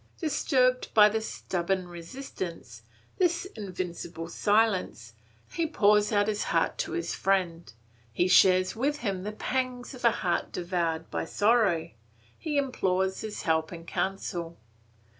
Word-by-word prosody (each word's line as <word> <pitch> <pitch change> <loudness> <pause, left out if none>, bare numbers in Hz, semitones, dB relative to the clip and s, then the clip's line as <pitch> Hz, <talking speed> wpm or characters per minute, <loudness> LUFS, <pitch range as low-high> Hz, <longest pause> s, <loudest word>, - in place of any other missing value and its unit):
Disturbed 260 -5 +1
by 210 -1 +8
this 220 +1 -2
stubborn 185 +1 -2
resistance, 170 - -7 0.4
this 350 -1 +2
invincible 180 -4 -5
silence, 205 - +1 0.4
he 335 -1 -1
pours 210 -7 +3
out 205 -1 +2
his 210 -1 -1
heart - - 0
to - - -2
his 350 0 -2
friend. 180 -4 0 0.4
He 175 +11 +1
shares 185 +1 +5
with 290 +6 -1
him 195 -4 -2
the 210 +3 -4
pangs 250 +3 -3
of 255 - -11
a 235 - +7
heart 175 -5 -1
devoured 170 -2 -2
by - - -2
sorrow; 205 -4 +2 0.4
he 300 -3 -3
implores 190 -8 0
his 215 -1 -5
help 160 -1 +1
and 165 -1 -9
counsel. 175 -3 -3
195 Hz, 135 wpm, -28 LUFS, 175-240 Hz, 0.4 s, by